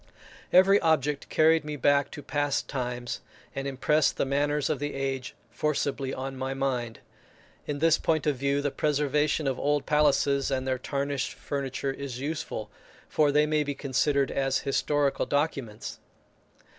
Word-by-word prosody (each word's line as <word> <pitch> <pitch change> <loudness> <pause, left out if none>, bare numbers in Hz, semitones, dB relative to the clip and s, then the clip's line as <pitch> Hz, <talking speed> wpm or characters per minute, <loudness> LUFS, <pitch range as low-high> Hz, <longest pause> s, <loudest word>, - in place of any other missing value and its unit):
Every 195 +2 +6
object 150 -3 +1
carried 160 0 +4
me 150 0 -4
back 145 0 +3
to 145 - -8
past 145 -1 -1
times, 125 -2 -4 0.3
and 135 0 -3
impressed 150 +3 +2
the - - +1
manners 145 +1 +1
of 150 -4 -1
the 145 0 -3
age 135 -2 -3 0.2
forcibly 140 -3 -1
on 135 0 -5
my 130 +1 -3
mind. 125 -4 -2 0.7
In 145 - -2
this 160 +2 +3
point 155 -2 +1
of 150 -2 +2
view 140 +2 0
the 145 - 0
preservation 150 +1 +1
of 135 -2 -1
old 145 0 +1
palaces 140 -2 +2
and 130 -1 -1
their 130 -1 0
tarnished 140 0 -2
furniture 135 -1 -3
is 135 -3 -6
useful, 150 +3 -4 0.4
for 150 -2 +3
they 150 +1 +4
may 150 0 +1
be 145 -1 -3
considered 140 0 +1
as 135 -1 +1
historical 140 0 +1
documents. 140 -7 -2
140 Hz, 155 wpm, -27 LUFS, 135-150 Hz, 0.7 s, Every